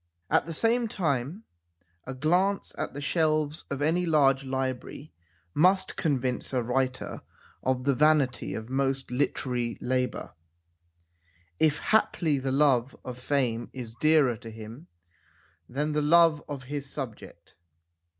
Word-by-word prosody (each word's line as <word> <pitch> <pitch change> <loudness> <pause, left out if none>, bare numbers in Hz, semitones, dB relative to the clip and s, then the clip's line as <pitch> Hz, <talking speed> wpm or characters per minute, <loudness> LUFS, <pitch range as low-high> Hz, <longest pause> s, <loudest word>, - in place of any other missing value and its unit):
At - - +3
the - - -4
same 230 +7 +2
time 160 - -2 0.6
a 130 - -5
glance 180 +8 +1
at - - -4
the 145 - -5
shelves 155 0 0
of 140 +1 -2
any 175 +4 +1
large 140 -4 +4
library 130 +2 -4 0.4
must 185 +4 +3
convince 130 -6 -1
a 125 -2 +1
writer 130 +2 -2 0.4
of 130 -1 0
the 140 +1 +2
vanity 145 -3 +2
of 110 0 -6
most 135 0 -1
literary 125 -2 -1
labour, 125 0 -2 1.3
if 155 -1 +3
haply 165 -9 +1
the 130 0 -2
love 135 -2 +2
of 125 -1 -6
fame 125 -4 0
is 120 -4 -7
dearer 155 -6 +4
to 115 - -10
him 115 +8 -10 0.8
than 150 +4 -1
the 150 0 +1
love 165 0 +5
of 140 -3 -5
his 140 +1 -5
sub 130 -7 -5
ject. - - -15
140 Hz, 135 wpm, -27 LUFS, 130-155 Hz, 1.3 s, love